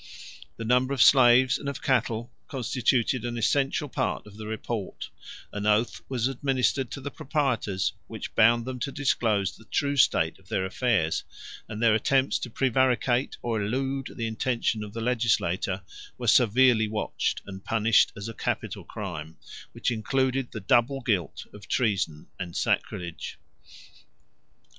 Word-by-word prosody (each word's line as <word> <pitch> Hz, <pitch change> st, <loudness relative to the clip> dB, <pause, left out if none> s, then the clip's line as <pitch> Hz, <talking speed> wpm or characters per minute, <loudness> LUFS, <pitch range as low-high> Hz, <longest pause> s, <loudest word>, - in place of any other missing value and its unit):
The 115 Hz, -, -5 dB
numbers 125 Hz, +4 st, +2 dB
of -, -, +10 dB
slaves 130 Hz, 0 st, +6 dB
and 140 Hz, -, -4 dB
of 140 Hz, -, -7 dB
cattle 120 Hz, -2 st, 0 dB, 0.2 s
constituted 125 Hz, -1 st, 0 dB
an 120 Hz, -1 st, -3 dB
essential 140 Hz, +5 st, +1 dB
part -, -, -2 dB
of 105 Hz, -1 st, -14 dB
the 110 Hz, 0 st, -8 dB
report; 110 Hz, -1 st, -5 dB, 0.4 s
an 105 Hz, 0 st, -2 dB
oath 105 Hz, +2 st, +2 dB
was 125 Hz, -2 st, 0 dB
administered 135 Hz, -1 st, 0 dB
to 140 Hz, -, -7 dB
the 140 Hz, +2 st, -5 dB
proprietors, 130 Hz, -, -1 dB
which 110 Hz, -2 st, -7 dB
bound 115 Hz, +1 st, +4 dB
them 130 Hz, -1 st, -5 dB
to 140 Hz, +3 st, -3 dB
disclose 110 Hz, -9 st, 0 dB
the 110 Hz, -, -17 dB
true 140 Hz, +3 st, 0 dB
state 80 Hz, -12 st, +3 dB
of 95 Hz, -, -24 dB
their 95 Hz, -4 st, 0 dB
affairs; 100 Hz, -5 st, 0 dB, 0.5 s
and 110 Hz, +1 st, -4 dB
their 115 Hz, -2 st, +5 dB
attempts 135 Hz, +5 st, +2 dB
to 125 Hz, -, -5 dB
prevaricate, 130 Hz, 0 st, +1 dB
or 115 Hz, -3 st, -1 dB
elude 135 Hz, +5 st, -2 dB
the 115 Hz, -, -3 dB
intention 115 Hz, -1 st, -1 dB
of 105 Hz, -1 st, -9 dB
the 115 Hz, -, -4 dB
legislator, 100 Hz, -6 st, 0 dB, 0.3 s
were -, -, -5 dB
severely 120 Hz, -1 st, +5 dB
watched, 105 Hz, 0 st, -2 dB
and 95 Hz, -1 st, -9 dB
punished 115 Hz, 0 st, +3 dB
as 100 Hz, +2 st, -6 dB
a 115 Hz, -, -6 dB
capital -, -, -3 dB
crime, 80 Hz, -6 st, -7 dB, 0.3 s
which -, -, -1 dB
included 130 Hz, +3 st, 0 dB
the 110 Hz, -, -5 dB
double 120 Hz, +6 st, +2 dB
guilt 100 Hz, -, -1 dB
of 100 Hz, -3 st, -12 dB
treason 95 Hz, -10 st, 0 dB
and 90 Hz, -2 st, -5 dB
sacrilege. 85 Hz, -2 st, -2 dB
115 Hz, 150 wpm, -27 LUFS, 105-130 Hz, 0.5 s, of